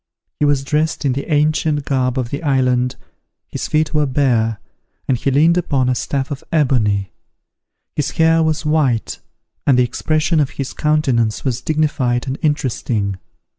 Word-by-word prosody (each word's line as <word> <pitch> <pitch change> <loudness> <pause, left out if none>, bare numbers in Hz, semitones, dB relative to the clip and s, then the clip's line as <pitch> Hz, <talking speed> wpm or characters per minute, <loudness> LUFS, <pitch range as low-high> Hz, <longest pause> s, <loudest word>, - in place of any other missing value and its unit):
He 150 - +2
was 145 -2 +2
dressed 155 +2 -1
in 135 - +2
the 140 +5 -5
ancient 150 0 +1
garb 130 -2 0
of 125 -2 -2
the 140 - -3
island, 125 -4 +1 0.5
his - - -5
feet 155 0 0
were 150 -1 +2
bare, 120 -5 +1 0.5
and 130 - +2
he 125 - -1
leaned 160 +6 +4
upon 135 -6 0
a - - +2
staff 135 +3 -2
of 140 - -5
ebony; 110 -10 +1 0.8
his 150 - -1
hair 165 0 +3
was 160 0 0
white, 150 -7 0 0.5
and 135 -3 +5
the 125 - +5
expression 155 +6 0
of 145 -3 +2
his 135 -2 -4
countenance 130 -8 0
was 125 -2 -1
dignified 145 -6 0
and 135 +1 -4
interesting. 120 - -1
140 Hz, 160 wpm, -18 LUFS, 125-155 Hz, 0.8 s, and